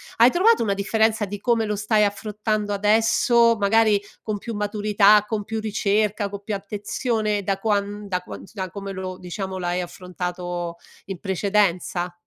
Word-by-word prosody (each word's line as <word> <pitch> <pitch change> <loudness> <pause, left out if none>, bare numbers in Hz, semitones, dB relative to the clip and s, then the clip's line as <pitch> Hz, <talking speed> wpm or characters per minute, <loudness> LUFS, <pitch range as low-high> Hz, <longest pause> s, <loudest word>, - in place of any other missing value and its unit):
Hai 235 +2 +6
trovato 435 - +4
una 205 -3 +1
differenza 220 +2 +1
di 205 +1 -6
come 230 0 +1
lo 210 0 -1
stai 210 +1 +2
affrontando 210 0 -2
adesso? 225 +3 +3
Magari 210 0 +3 0.2
con 215 -2 -3
più 230 +2 -6
maturità, 210 0 +3
con 215 -1 -2
più 225 +2 -4
ricerca, 210 -1 0
co 200 0 -7
più 205 +1 -4
attenzione 210 +1 -2
da 195 0 -1
quan 205 0 -1
da 180 -2 -1
qua - - -9
da 190 -3 -4
come 200 0 -6
lo 185 -1 -6
diciamo 190 +1 -5
l'hai 175 0 -1
affrontato 175 -1 -5 0.3
in 195 -3 -6
precedenza? 190 -2 0
205 Hz, 155 wpm, -23 LUFS, 195-215 Hz, 0.3 s, Hai